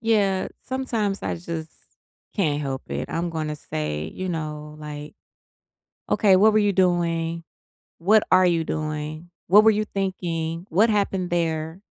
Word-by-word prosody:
Yeah, 205 -4 +2 0.2
sometimes 230 -6 -2
I - - -2
just 165 -2 -6 0.6
can't 150 -8 +1
help 135 -2 -3
it. - - -3
I'm 170 +1 -2
gonna 155 -2 -3
say, 75 - -3
you 185 0 -4
know, 150 -2 -5
like, 150 +3 -8 0.9
"Okay. 195 -3 +5
What 215 +3 +6
were 215 - +4
you 205 -1 +3
doing? 170 -3 +1 0.5
What 210 +5 +4
are 185 0 +6
you 170 -2 +2
doing? 155 +2 -4 0.2
What 205 +4 +7
were 220 - +8
you 215 0 +1
thinking? 175 -3 -3
What 210 +8 +4
happened 195 -4 0
there?" 165 0 -1
170 Hz, 145 wpm, -24 LUFS, 155-195 Hz, 0.9 s, were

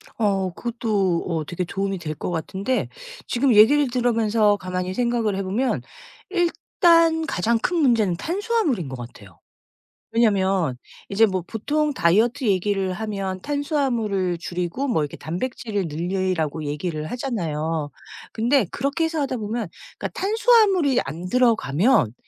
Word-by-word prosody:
어 195 -4 0
그것도 210 -6 -1
어 165 -3 -1
되게 175 +3 -3
도움이 195 +2 -2
될 155 -2 -5
것 - - -4
같은데 195 +9 -2 0.4
지금 250 +1 +2
얘기를 260 +7 +6
들으면서 225 -4 +2
가만히 185 -1 -3
생각을 235 -4 0
해 195 - -2
보면 220 +8 -1 0.5
일단 335 -2 +3
가장 225 - +1
큰 350 +9 -1
문제는 230 - +3
탄수화물인 340 - -1
것 130 - -5
같아요. 110 -7 -11 0.7
왜냐면 195 - +2 0.3
이제 215 +3 +4
뭐 185 -3 -2
보통 295 +9 -1
다이어트 225 - +2
얘기를 195 -1 +1
하면 195 -2 -4
탄수화물을 240 - -1
줄이고 175 +10 -3
뭐 160 - +1
이렇게 145 - -5
단백질을 205 - -3
늘리라고 165 -1 -2
얘기를 155 +1 -3
하잖아요. 165 - -2 0.4
근데 240 +2 +2
그렇게 280 +5 -1
해서 325 -1 -1
하다 265 -2 -1
보면 220 0 -3 0.3
그러니까 - - -5
탄수화물이 405 - +3
안 165 +6 -6
들어가면 225 - +3
210 Hz, 320 characters per minute, -23 LUFS, 180-260 Hz, 0.7 s, 얘기를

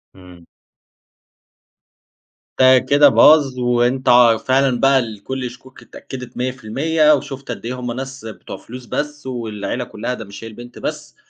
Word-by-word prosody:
إمم. 90 -2 -16 2.1
ده 130 0 +6
كده 145 +3 +4
باظ، 140 -3 +5
وأنتَ 125 +2 +1
ع 120 -2 +6
فعلًا 130 -1 +1
بقى 135 0 +4
الكل 120 +3 -5
الشكوك 125 +1 -11
اتأكدت 125 -2 -10
100% 135 +6 +1
وشُفت 135 -1 -7
قد 115 - -8
إيه 125 +2 -5
هم 125 -1 -4
ناس 135 0 -7
بتوع 110 - -9
فلوس 125 +1 -11
بس، 150 +2 -5
والعيلة 115 -1 -4
كلّها 120 +1 -5
ده 115 -3 -7
مش 100 +2 -11
هي - - -7
البنت 120 +2 -12
بس، - - -6
125 Hz, 145 wpm, -19 LUFS, 120-135 Hz, 2.1 s, ده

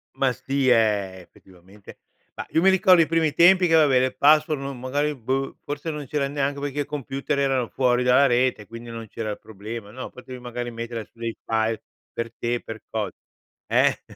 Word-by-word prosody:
Ma 135 -2 +2
sì 135 +1 -1
è, 105 -5 +2
effettivamente 95 +3 -17 0.4
mah - - -6
io 160 - +2
mi 190 - +4
ricordo 185 -2 +5
i 160 - +5
primi 160 -2 +1
tempi 180 +2 +6
che 165 - +2
vabbè, 145 -5 +5
le 130 0 +1
password 150 0 +3
non 135 -2 -6
magari 145 +4 -1
boh, 135 +3 -2
forse 145 +3 -4
non 150 -2 -5
c'era 140 -1 -1
neanche 140 0 -2
perché 145 0 -3
i - - 0
computer 140 0 -3
erano 135 -4 +1
fuori 125 -1 +1
dalla 125 +3 +5
rete, 125 -4 +1
quindi 115 +1 -10
non 115 -1 -7
c'era 110 +1 -5
il 105 - -5
problema. 110 +1 -8
No, 130 +4 -7
potevi 125 0 -10
magari 120 0 -5
mettere 115 -1 -5
su - - -31
dei 115 -1 -3
file 110 0 0 0.3
per 115 0 -4
te, 120 0 -1
per 110 -1 -8
cosa. 110 -2 -2 0.6
Eh? - - +2
130 Hz, 195 wpm, -24 LUFS, 115-145 Hz, 0.6 s, tempi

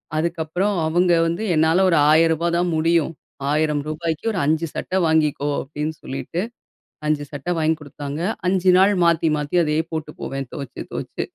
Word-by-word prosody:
அதுக்கப்புறம் 170 +5 -1
அவங்க 175 +2 +3
வந்து 170 +6 -2
என்னால 160 +4 +3
ஒரு 165 - +3
1000 165 +1 +5
ரூபா 170 - 0
தான் 175 +1 +1
முடியும். 165 0 +2 0.4
1000 150 -1 +1
ரூபாய்க்கு 160 +5 -2
ஒரு 200 - -2
5 160 +2 +1
சட்டை 185 - -2
வாங்கிக்கோ 150 -2 +1
அப்டின்னு 150 +3 -4
சொல்லிட்டு, 135 +6 -4 0.7
5 150 -1 0
சட்டை 145 +5 -3
வாங்கி 160 0 +2
குடுத்தாங்க. 145 0 -6 0.3
5 185 0 +3
நாள் 195 +2 +5
மாத்தி 165 -1 +3
மாத்தி 150 +3 -2
அதையே 155 +1 +1
போட்டு 155 -1 -4
போவேன் 135 -1 -4
துவைச்சு 140 -3 -7
துவைச்சு. - - -4
160 Hz, 160 wpm, -22 LUFS, 150-170 Hz, 0.7 s, 1000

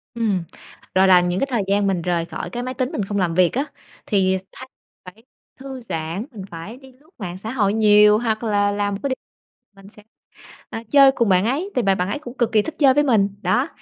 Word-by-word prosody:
Ừm. 205 -7 0 0.5
Rồi 190 +1 +5
là 180 -1 +7
những 180 +1 -1
cái 275 - 0
thời 235 -5 0
gian 200 0 +1
mình 185 -3 0
rời 170 -1 -1
khỏi - - -6
cái 245 0 -5
máy 255 +1 -4
tính, 255 0 -2
mình 205 - -2
không 205 0 -3
làm 180 -4 0
việc 180 -2 +3
á, 275 +4 -1 0.4
thì 190 -3 +2
thay 260 - -11 0.4
phải 200 +5 -13 0.4
thư 265 -1 -8
giãn, 165 0 -4
mình 200 -5 -9
phải 175 +9 -8
đi 265 -1 -16
lướt 285 +6 -26
mạng 180 -5 -6
xã 220 +4 -6
hội 205 -6 +1
nhiều, 210 -1 +5
hoặc 225 -1 -2
là 205 -2 +1
làm 205 0 -1
một 195 - -7
cái 280 - -1
điều 260 - -1 0.7
mình 200 - -14
sẽ, 210 0 -17 0.7
à, 225 - -6
chơi 275 -2 +7
cùng 235 -5 0
bạn 185 0 +3
ấy, 290 - -1
thì 250 - +2
bạn 195 -2 +1
bạn 180 +1 -1
ấy 210 - -2
cũng 245 -4 -10
cực 235 -2 0
kỳ 215 -1 +4
thích 320 - -6
chơi 275 -3 +5
với 295 - +4
mình. 220 -7 +3
Đó, 260 +8 +1
210 Hz, 245 wpm, -21 LUFS, 190-250 Hz, 0.7 s, là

